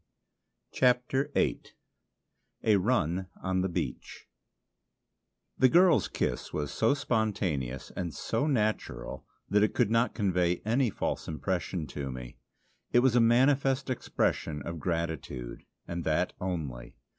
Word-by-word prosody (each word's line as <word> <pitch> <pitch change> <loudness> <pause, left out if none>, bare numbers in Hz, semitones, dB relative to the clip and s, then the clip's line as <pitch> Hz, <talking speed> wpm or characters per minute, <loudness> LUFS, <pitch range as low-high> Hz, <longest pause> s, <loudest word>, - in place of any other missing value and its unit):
CHAPTER 125 +2 +2
VIII - - +2 1.0
A 105 -2 +5
RUN 95 -4 +1 0.2
ON 95 -1 +1
THE 95 - 0
BEACH 85 - -5 1.3
The 130 - +6
girl's 175 0 +5
kiss 60 - -2
was 75 -2 -3
so 115 +5 +2
spontaneous 95 - -1
and 85 -2 -3
so 140 - -1
natural 110 - -1 0.2
that 105 +1 +3
it 105 - +2
could 115 -3 +2
not 115 +2 +2
convey 90 -4 +1
any 120 +3 +2
false - - -3
impression 85 +1 -2
to 70 -2 -5
me. 65 -1 -9 0.5
It 120 - +5
was 130 -2 +3
a 120 - +6
manifest 135 +3 +3
expression 75 - -1
of 85 +2 -5
gratitude, 80 -8 -3 0.2
and 85 0 -4
that 80 +3 +1
only. 80 -10 -4
95 Hz, 125 wpm, -29 LUFS, 80-125 Hz, 1.3 s, The